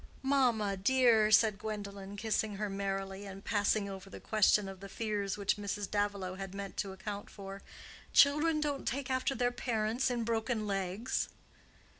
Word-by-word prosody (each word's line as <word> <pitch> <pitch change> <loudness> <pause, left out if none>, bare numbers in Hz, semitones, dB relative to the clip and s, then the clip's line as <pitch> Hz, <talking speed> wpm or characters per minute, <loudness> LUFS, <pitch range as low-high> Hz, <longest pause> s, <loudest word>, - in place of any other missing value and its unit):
"Mamma, 240 -7 +2
dear," 225 0 +4
said 215 -1 +5
Gwendolen, 200 -2 -6
kissing 215 0 0
her 205 0 -3
merrily, 195 0 -3
and 195 0 -9
passing 205 -1 +1
over 195 0 -8
the - - -9
question 210 -1 +3
of 195 -1 -8
the 200 +1 -9
fears 205 -2 -2
which 200 0 +1
Mrs. 205 0 -3
Davilow 200 -2 -1
had 195 0 -6
meant 200 0 -6
to 195 - -2
account 200 +2 -6
for, 195 -1 -8 0.5
"children 300 +3 +5
don't 290 -2 -2
take 270 +1 -2
after 260 +1 +1
their 245 +1 +1
parents 230 0 0
in 240 -2 -1
broken 225 0 -1
legs." 195 +4 -1
205 Hz, 160 wpm, -33 LUFS, 195-230 Hz, 0.5 s, said